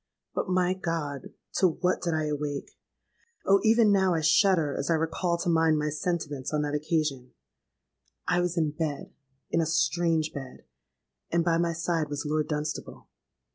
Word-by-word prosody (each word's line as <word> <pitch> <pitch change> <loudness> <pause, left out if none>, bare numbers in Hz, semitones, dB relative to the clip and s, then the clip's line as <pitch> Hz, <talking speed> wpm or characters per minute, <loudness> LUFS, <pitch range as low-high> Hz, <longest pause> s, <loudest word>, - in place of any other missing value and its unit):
"But, - - -2
my 185 0 +2
God! 165 -7 -4 0.3
to 185 - +5
what 180 +2 0
did 170 -2 -1
I 155 -1 0
awake? 145 -1 -3 0.7
Oh! 195 0 +5
even 225 -1 +5
now 190 -3 +3
I 160 - 0
shudder 160 -1 +3
as 140 - -3
I 165 - +4
recall 165 +2 0
to 170 - -4
mind 160 -2 +3
my 150 0 0
sentiments 150 -4 -3
on 150 -1 0
that 145 0 -2
occasion! 150 -4 -1 0.9
I 175 +2 +2
was 175 0 -2
in 155 -3 +1
bed—in 145 -1 -4
a 160 - 0
strange 160 +1 +1
bed; 135 -3 -8 0.7
and 170 0 +1
by 165 -1 +2
my 170 -1 +1
side 165 -2 -1
was 145 0 -4
Lord 155 0 0
Dunstable. 150 0 -4
160 Hz, 165 wpm, -27 LUFS, 150-175 Hz, 0.9 s, to